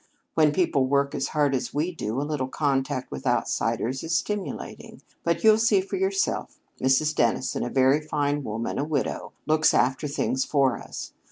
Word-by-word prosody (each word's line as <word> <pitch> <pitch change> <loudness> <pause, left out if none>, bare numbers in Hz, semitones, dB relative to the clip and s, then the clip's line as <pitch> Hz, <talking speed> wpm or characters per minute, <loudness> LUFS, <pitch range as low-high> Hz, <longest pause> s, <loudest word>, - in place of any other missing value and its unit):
When 155 -2 +4
people 150 -5 +1
work 140 +1 +1
as 135 - -1
hard 145 -3 +1
as 125 0 -2
we 160 +5 0
do, 120 -5 -3
a - - -1
little 145 -3 -2
contact 135 -2 -1
with 70 - -5
outsiders 130 +3 0
is 165 0 -1
stimulating. 205 +4 -4 0.2
But - - 0
you'll 220 0 +6
see 220 -3 +4
for 195 +1 -4
yourself. 195 +1 -1 0.2
Mrs. 135 +4 +3
Dennison, 120 -1 0
a - - -2
very 135 +3 +3
fine 145 -1 -1
woman, 115 +2 -3
a - - +1
widow, 150 -2 -2
looks 155 0 +3
after 135 +4 +1
things 135 -2 0
for 140 -3 +1
us. - - -8
145 Hz, 175 wpm, -25 LUFS, 130-155 Hz, 0.2 s, you'll